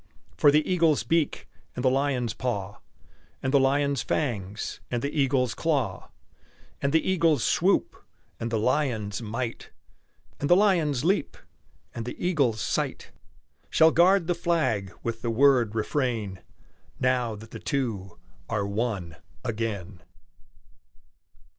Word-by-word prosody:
For 145 - +5
the 150 +1 +3
eagle's 165 -7 +3
beak, 160 +4 0 0.3
and 125 - -3
the - - +6
lion's 130 -4 0
paw, 105 -5 -3 0.6
And 130 +1 -1
the 140 - +6
lion's 140 0 +2
fangs, 105 -8 -3
and 120 -1 -2
the 140 - -1
eagle's 130 -4 +2
claw, 145 -7 -1 0.7
And 140 - +1
the 160 +1 +2
eagle's 165 - +2
swoop, - - +2 0.4
and 115 - -3
the 115 - 0
lion's 110 -4 0
might, 115 +2 -4 0.7
And 145 - -2
the 175 - +7
lion's 165 -9 +2
leap, 185 -4 +1 0.6
and 115 - -5
the 125 - -6
eagle's 140 -11 +1
sight, - - -2 0.6
Shall 160 0 +5
guard 180 +2 +4
the 175 - +1
flag 155 - 0
with 115 -1 -3
the 120 - -2
word 120 -2 +3
"Refrain!" 110 -5 -1 0.6
Now 125 -3 +1
that 110 +2 -12
the - - -7
two 110 - -3 0.3
are 105 -3 -1
one 100 -6 -3 0.3
again! 105 -6 -4
125 Hz, 130 wpm, -26 LUFS, 110-150 Hz, 0.7 s, the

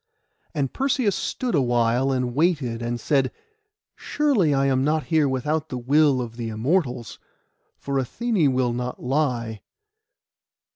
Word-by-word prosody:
And 140 -3 -1
Perseus 260 -7 +1
stood 255 -1 -2
still 145 - +3
a - - +1
while, 120 +2 +2
and 125 -2 -1
waited, 140 -6 0
and 120 0 -3
said, 135 0 +1 0.6
'Surely 265 - +1
I 135 -1 +2
am 130 -1 +2
not 155 +2 +1
here 155 -3 +4
without 150 +4 -1
the 125 - -4
will 140 +1 +3
of 115 -1 -7
the 115 -2 -4
Immortals, 125 - -1 0.6
for 140 -1 -2
Athené 180 - 0
will 125 -2 +1
not 125 +1 -4
lie. 125 -5 -1
135 Hz, 145 wpm, -24 LUFS, 120-155 Hz, 0.6 s, here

